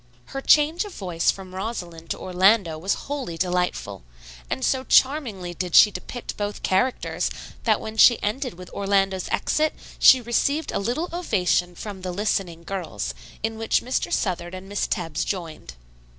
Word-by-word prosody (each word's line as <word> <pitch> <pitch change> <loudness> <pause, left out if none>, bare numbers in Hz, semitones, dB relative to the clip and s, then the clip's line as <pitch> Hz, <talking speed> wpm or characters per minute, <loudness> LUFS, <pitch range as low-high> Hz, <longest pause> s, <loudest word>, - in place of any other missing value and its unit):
Her 270 - -3
change 305 +6 +4
of 410 -3 -9
voice 175 -4 0
from 190 -1 -3
Rosalind 180 -5 -6
to - - -2
Orlando 185 -1 +3
was 190 +5 0
wholly 275 - -4
delightful, 180 - -1 0.5
and 130 - -1
so 260 -1 +1
charmingly 240 - +2
did 180 0 -3
she 210 - +9
depict 245 +4 -7
both 205 0 -4
characters 220 +7 0 0.4
that - - +3
when 220 0 -7
she 240 +1 +7
ended 245 - -2
with 180 0 -11
Orlando's 195 -2 0
exit 310 0 +1 0.2
she 260 - +8
received 280 +6 0
a - - -1
little 245 - -1
ovation 180 - 0
from 200 0 -7
the 185 0 -4
listening 180 -3 -2
girls, 185 -1 -4 0.3
in 225 0 -2
which 225 - +1
Mr. 255 +2 -1
Southard 175 -2 -1
and 185 +1 -9
Miss 205 0 -1
Tebbs 165 -4 -2
joined. 165 - -5
195 Hz, 160 wpm, -24 LUFS, 180-240 Hz, 0.5 s, she